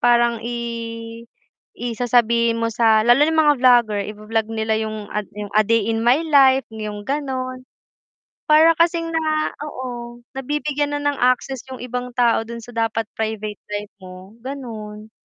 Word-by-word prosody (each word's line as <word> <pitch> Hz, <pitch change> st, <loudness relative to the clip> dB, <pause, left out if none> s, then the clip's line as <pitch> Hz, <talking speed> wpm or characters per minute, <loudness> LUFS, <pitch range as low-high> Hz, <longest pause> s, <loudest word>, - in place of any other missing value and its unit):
parang 235 Hz, -1 st, +3 dB
i 240 Hz, 0 st, -4 dB, 1.2 s
i 240 Hz, -2 st, -4 dB
sasabihin 235 Hz, -1 st, +2 dB
mo 230 Hz, -, +1 dB
sa 225 Hz, -1 st, +3 dB
lalo 255 Hz, +5 st, +6 dB
yung 320 Hz, 0 st, +2 dB
mga 295 Hz, -1 st, +5 dB
vlogger 240 Hz, -5 st, +4 dB
i-bo-vlog 215 Hz, +1 st, -2 dB
nila 220 Hz, 0 st, 0 dB
yung 215 Hz, -1 st, -5 dB
ad 210 Hz, 0 st, -3 dB
yung 205 Hz, 0 st, -6 dB
a 215 Hz, -, +7 dB
day 230 Hz, +2 st, +3 dB
in 225 Hz, -, -1 dB
my 250 Hz, +6 st, +4 dB
life, 270 Hz, -3 st, +5 dB
yung 210 Hz, -1 st, -6 dB
ganon. 260 Hz, -2 st, -3 dB, 0.8 s
Para 315 Hz, +1 st, +7 dB
kasing 335 Hz, 0 st, +2 dB
na 310 Hz, -1 st, 0 dB, 0.2 s
oo, 240 Hz, -3 st, -7 dB
nabibigyan 290 Hz, +2 st, -2 dB
na 290 Hz, -, -3 dB
ng 290 Hz, -1 st, 0 dB
access 255 Hz, +1 st, +1 dB
yung 260 Hz, -1 st, -8 dB
ibang 250 Hz, 0 st, -5 dB
tao 235 Hz, -2 st, +2 dB
dun 235 Hz, 0 st, -7 dB
sa 245 Hz, -, -11 dB
dapat 225 Hz, -1 st, -1 dB
private 215 Hz, -2 st, -3 dB
life 210 Hz, 0 st, -5 dB
mo, 185 Hz, +1 st, -12 dB
ganun. 220 Hz, -5 st, -8 dB
240 Hz, 155 wpm, -21 LUFS, 220-270 Hz, 1.2 s, a